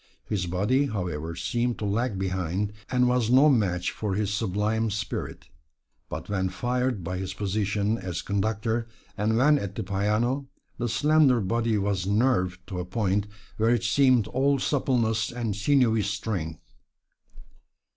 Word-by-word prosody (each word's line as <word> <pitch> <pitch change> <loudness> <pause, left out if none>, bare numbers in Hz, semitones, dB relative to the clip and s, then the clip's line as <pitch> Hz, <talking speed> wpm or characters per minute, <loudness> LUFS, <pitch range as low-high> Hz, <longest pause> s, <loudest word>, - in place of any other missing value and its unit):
His 95 -4 -2
body, 105 +11 +1
however, 85 - -4
seemed 120 +5 -1
to 105 - -4
lag 105 +1 0
behind, 95 +1 -2 0.2
and 125 0 +3
was 125 -2 +1
no 135 +5 +6
match 95 -9 +1
for 105 -3 -3
his 105 -1 -1
sublime 110 +2 0
spirit. 105 +1 -4 0.6
But - - -6
when 95 -2 -1
fired 125 +2 -1
by 90 +2 -3
his 95 0 -5
position 105 +2 -1
as 90 -2 -4
Conductor, 110 +3 -1 0.3
or 105 - -1
when 130 +7 +4
at 100 -3 -5
the - - -3
piano, 105 +8 0 0.3
the 120 0 -1
slender 145 -1 +4
body 115 +2 0
was 100 -2 -1
nerved 100 -4 +1
to 90 -3 -4
a - - -2
point 100 +1 0 0.3
where 110 +1 +2
it 120 -1 +2
seemed 125 -1 +4
all 140 +2 +2
suppleness 120 -6 0
and 120 -4 -3
sinewy 115 0 +3
strength. 100 -6 -3
105 Hz, 145 wpm, -26 LUFS, 95-120 Hz, 0.6 s, no